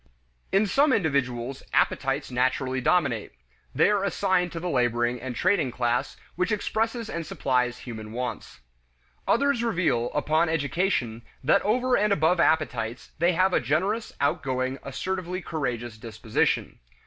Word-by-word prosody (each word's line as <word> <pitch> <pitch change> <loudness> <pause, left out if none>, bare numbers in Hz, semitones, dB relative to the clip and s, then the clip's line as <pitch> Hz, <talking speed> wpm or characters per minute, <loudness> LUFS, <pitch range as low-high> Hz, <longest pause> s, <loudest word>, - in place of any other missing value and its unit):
In 195 +2 +3
some 275 +9 +3
individuals, 135 - 0
appetites 135 0 +1
naturally 130 +1 0
dominate; 125 - +1 0.4
they 160 +9 +4
are 205 -2 +1
assigned 180 -2 +1
to 165 - -4
the 180 - -4
laboring 120 -4 +1
and 125 -1 -5
trading 180 - +2
class, 120 0 -1 0.2
which 180 +5 0
expresses 225 +2 -1
and 170 -5 -4
supplies 125 -5 0
human 110 -3 -8
wants. 125 - -5 0.7
Others 280 -1 +2
reveal, 170 - +1
upon 155 +3 +2
education, 145 - 0 0.2
that 160 +9 +4
over 245 +4 +2
and 210 -1 +2
above 170 -1 +3
appetites, 125 -8 0
they 175 +2 +3
have 185 +2 +2
a - - +4
generous, 195 - -1
outgoing, 130 -1 -1
assertively 185 +6 -3
courageous 120 - -4
disposition. 110 -1 -1
150 Hz, 135 wpm, -26 LUFS, 125-185 Hz, 0.7 s, they